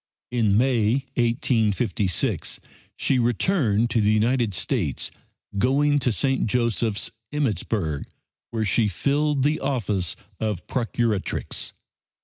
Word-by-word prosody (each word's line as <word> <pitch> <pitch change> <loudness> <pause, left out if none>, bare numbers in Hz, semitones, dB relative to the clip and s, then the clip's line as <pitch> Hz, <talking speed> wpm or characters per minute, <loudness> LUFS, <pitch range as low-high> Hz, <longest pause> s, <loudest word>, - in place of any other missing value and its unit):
In 110 -5 +3
May, 125 +1 +2
1856, 115 -5 0 0.4
she 130 - +1
returned 120 - +2
to 115 - +2
the 105 - +3
United 115 -1 +2
States, - - -1 0.5
going 145 +5 +3
to 125 - +1
St. 135 +2 +1
Joseph's, 115 -2 0 0.2
Emmittsburg 105 - -1 0.4
where 110 -1 -1
she 105 +3 +3
filled 140 - +1
the 150 +2 +2
office 105 - -1 0.2
of 105 -5 -2
Procuratrix. 115 -4 -1
115 Hz, 105 wpm, -24 LUFS, 105-130 Hz, 0.5 s, In